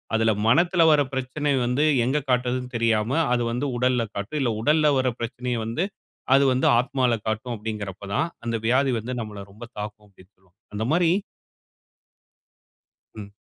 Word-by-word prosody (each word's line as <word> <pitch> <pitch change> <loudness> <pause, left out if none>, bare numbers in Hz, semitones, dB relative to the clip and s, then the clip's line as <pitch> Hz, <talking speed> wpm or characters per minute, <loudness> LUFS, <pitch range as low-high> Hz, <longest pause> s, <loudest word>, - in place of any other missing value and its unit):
அதுல 110 0 +3 0.2
மனத்துல 170 +8 +3
வர 150 -1 +5
பிரச்சனை 130 +3 -2
வந்து 125 +5 +1 0.2
எங்க 135 +4 +1
காட்டுறது 125 0 +1 0.2
தெரியாம, 115 -1 +1 0.2
அது 120 - +1
வந்து 125 +4 -2
உடல்ல 125 0 +2
காட்டும். 100 +10 -3
இல்ல 120 -4 +1
உடல்ல 150 +4 +3
வருற 130 -1 +1
பிரச்சனைய 120 0 -3
வந்து 115 +11 -1 0.5
அது 140 +1 +6
வந்து 130 - 0
ஆத்மால 130 -1 +1
காட்டும் 110 +3 -2
அப்படிங்கிறப்பதான், 100 - -3 0.2
அந்த 115 0 -2
வியாதி 130 +3 +3
வந்து 115 +4 -6
நம்மள 105 -2 -7
ரொம்ப 115 +4 -10
தாக்கும் 105 0 -7
அப்படி. 95 -1 -20 0.5
அந்த 105 - -2
மாரி 170 0 +3 2.0
ம். 105 -2 -8
125 Hz, 145 wpm, -24 LUFS, 110-135 Hz, 2.0 s, அது